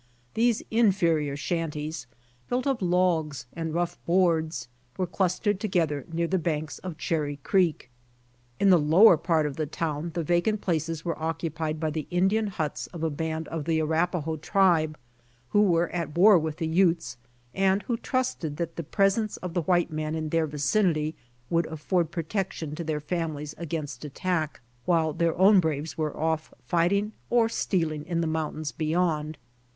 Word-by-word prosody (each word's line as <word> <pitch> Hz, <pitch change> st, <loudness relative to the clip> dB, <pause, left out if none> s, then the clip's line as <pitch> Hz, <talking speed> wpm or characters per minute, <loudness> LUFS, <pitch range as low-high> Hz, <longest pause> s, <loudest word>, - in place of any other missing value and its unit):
These 230 Hz, 0 st, +2 dB
inferior 170 Hz, -10 st, +2 dB
shanties, 155 Hz, -3 st, -3 dB, 0.4 s
built 250 Hz, +2 st, 0 dB
of 270 Hz, -5 st, 0 dB
logs 175 Hz, -6 st, +1 dB
and 165 Hz, -1 st, -3 dB
rough 175 Hz, +1 st, -2 dB
boards, 165 Hz, -7 st, +2 dB, 0.3 s
were 185 Hz, -, 0 dB
clustered 190 Hz, +3 st, 0 dB
together 165 Hz, -, 0 dB
near 170 Hz, +1 st, 0 dB
the 185 Hz, +2 st, 0 dB
banks 155 Hz, -2 st, -2 dB
of 180 Hz, -4 st, -7 dB
Cherry 150 Hz, -3 st, -1 dB
creek. 170 Hz, -9 st, +1 dB, 0.7 s
In 200 Hz, -1 st, +5 dB
the 180 Hz, -, +6 dB
lower 170 Hz, +7 st, +7 dB
part 160 Hz, -1 st, +1 dB
of 145 Hz, -2 st, -4 dB
the 155 Hz, -1 st, -1 dB
town 155 Hz, +1 st, -3 dB
the 170 Hz, -, -1 dB
vacant 175 Hz, +7 st, +1 dB
places 165 Hz, -3 st, -2 dB
were 165 Hz, -2 st, -3 dB
occupied 160 Hz, -1 st, -2 dB
by 155 Hz, -1 st, -1 dB
the 155 Hz, -1 st, -4 dB
In 180 Hz, +2 st, +3 dB
dian 220 Hz, +1 st, +1 dB
huts 160 Hz, -6 st, -3 dB
of 170 Hz, -3 st, -8 dB
a 160 Hz, -, +1 dB
band 160 Hz, +2 st, -3 dB
of 160 Hz, -3 st, -4 dB
the 160 Hz, -1 st, +1 dB
Arapahoe 160 Hz, 0 st, 0 dB
tribe, 165 Hz, -3 st, +2 dB, 0.5 s
who 205 Hz, -, +4 dB
were 175 Hz, -4 st, +3 dB
at 170 Hz, -3 st, -4 dB
war 195 Hz, 0 st, +7 dB
with 155 Hz, -1 st, -3 dB
the 165 Hz, -, -2 dB
Utes, 165 Hz, -4 st, +2 dB, 0.4 s
and 195 Hz, +1 st, +2 dB
who 240 Hz, -, -1 dB
trusted 230 Hz, -, -2 dB
that 165 Hz, 0 st, -4 dB
the 170 Hz, -, -3 dB
pres 195 Hz, +6 st, +2 dB
ence 215 Hz, -2 st, -3 dB
of 180 Hz, -2 st, -6 dB
the 175 Hz, -, +1 dB
white 175 Hz, 0 st, +1 dB
man 155 Hz, 0 st, -2 dB
in 155 Hz, -1 st, -3 dB
their 165 Hz, 0 st, +1 dB
vicinity 155 Hz, +1 st, +1 dB, 0.4 s
would 170 Hz, -1 st, +2 dB
afford 160 Hz, +2 st, -1 dB
protection 165 Hz, -2 st, -3 dB
to 170 Hz, -, -4 dB
their 155 Hz, -2 st, -2 dB
families 150 Hz, -2 st, -3 dB
against 150 Hz, -6 st, -4 dB
attack, 155 Hz, 0 st, -2 dB, 0.2 s
while 165 Hz, -3 st, +2 dB
their 165 Hz, +1 st, 0 dB
own 195 Hz, +2 st, +7 dB
braves 160 Hz, -2 st, -1 dB
were 155 Hz, -2 st, -2 dB
off" 160 Hz, 0 st, -1 dB
fighting 195 Hz, +5 st, +1 dB, 0.2 s
or 235 Hz, -2 st, +4 dB
stealing 165 Hz, -9 st, -1 dB
in 170 Hz, -1 st, -1 dB
the -, -, 0 dB
mountains 155 Hz, -1 st, -2 dB
beyond. 155 Hz, -1 st, -1 dB
165 Hz, 170 wpm, -27 LUFS, 155-180 Hz, 0.7 s, lower